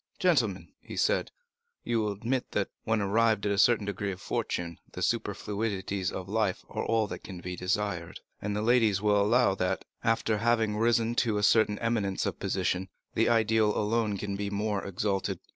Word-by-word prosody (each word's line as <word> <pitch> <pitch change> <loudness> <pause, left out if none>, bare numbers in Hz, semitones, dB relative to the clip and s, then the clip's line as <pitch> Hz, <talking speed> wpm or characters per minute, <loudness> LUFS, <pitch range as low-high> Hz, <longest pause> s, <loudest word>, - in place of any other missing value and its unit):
"Gentlemen," - - +1
he - - -9
said, - - +2 0.5
"you 115 - 0
will 105 -1 0
admit 120 +5 -2
that, 100 - 0 0.2
when 110 -1 +1
arrived 110 +1 +2
at 100 - +1
a 100 - +1
certain 115 -4 +4
degree 100 0 -2
of 90 - -7
fortune, 85 -2 -3
the - - -4
superfluities 100 -3 -1
of 95 0 -6
life 105 -2 -1
are - - -3
all 115 -1 +2
that - - -7
can 95 -3 -8
be 90 +1 -5
desired; 90 -2 -2 0.2
and 105 0 -2
the 105 - -1
ladies 110 -4 +3
will 105 0 +3
allow 105 0 +4
that, 90 -1 -1 0.2
after 115 -1 +1
having 115 -2 +2
risen 115 +1 +2
to 110 -3 +2
a 105 - -1
certain 105 0 +4
eminence 110 -5 -1
of - - -3
position, 95 +1 -1 0.2
the 115 - +2
ideal 110 -2 +3
alone 105 -1 0
can 100 0 -3
be 100 0 -3
more 105 0 -1
exalted. 95 -1 -2
105 Hz, 180 wpm, -29 LUFS, 100-115 Hz, 0.5 s, certain